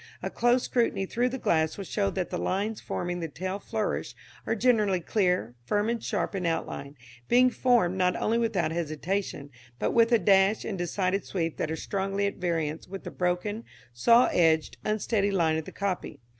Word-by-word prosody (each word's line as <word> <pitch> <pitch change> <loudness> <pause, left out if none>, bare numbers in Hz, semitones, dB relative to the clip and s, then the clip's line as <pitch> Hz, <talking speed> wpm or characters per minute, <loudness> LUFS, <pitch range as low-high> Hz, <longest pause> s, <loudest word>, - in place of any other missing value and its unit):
A - - -3
close 240 +1 +2
scrutiny 230 -5 0
through 240 +5 0
the 260 - -4
glass 160 -9 +1
will 200 - -4
show 200 +2 0
that 185 -2 -3
the 180 - -2
lines 205 +3 -1
forming 175 0 -3
the 165 - -3
tail 185 +6 -4
flourish - - -3 0.3
are 225 - +1
generally 215 -5 +3
clear, 180 - 0
firm 205 - 0
and 235 -1 -2
sharp - - -2
in 190 -2 -3
outline, 145 -3 -3 0.3
being 250 +1 +5
formed, 225 -9 +2
not 180 -1 +2
only 230 +2 +1
without 195 -9 0
hesitation, 165 -1 -3 0.3
but - - 0
with 230 0 +4
a 235 - +6
dash 195 +1 +3
and 195 -4 -4
decided 185 +2 0
sweep 165 -4 -3
that - - -2
are 160 - -1
strongly 195 +3 -2
at 200 - -2
variance 165 -3 -2
with 195 +1 -7
the - - -6
broken, 180 +5 -1 0.3
saw 230 - +5
edged, 160 -2 +2
unsteady 215 -1 0
line 165 -5 +2
of 160 - -4
the - - -8
copy. 190 -7 -3
190 Hz, 185 wpm, -28 LUFS, 170-215 Hz, 0.3 s, a